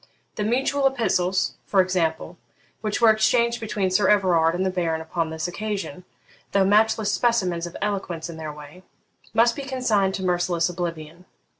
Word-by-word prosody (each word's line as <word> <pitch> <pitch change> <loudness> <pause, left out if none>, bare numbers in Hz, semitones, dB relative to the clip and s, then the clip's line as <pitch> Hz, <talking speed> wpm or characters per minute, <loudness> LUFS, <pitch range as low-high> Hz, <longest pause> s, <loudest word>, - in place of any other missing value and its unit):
The 210 - -3
mutual 270 +5 +1
epistles, 190 -8 0
for 195 - +2
example, 175 -2 0 0.4
which 215 -1 -2
were 230 -2 +6
exchanged 235 +2 +2
between 205 -4 -2
Sir 190 +1 +3
Everard 175 -5 +3
and 185 +2 -1
the 190 - 0
Baron 170 -3 -1
upon 160 0 -3
this 160 +1 -3
occasion, 195 -1 -5 0.5
though 195 -1 +4
matchless 215 +1 +3
specimens 185 -9 0
of 170 - -9
eloquence 190 -5 -3
in 165 -2 -9
their 155 -1 -5
way, 150 +4 -12 0.5
must 235 +1 +4
be - - -5
consigned 235 -8 0
to 190 - -5
merciless 175 -2 +1
oblivion. 170 -1 -6
185 Hz, 160 wpm, -23 LUFS, 170-215 Hz, 0.5 s, were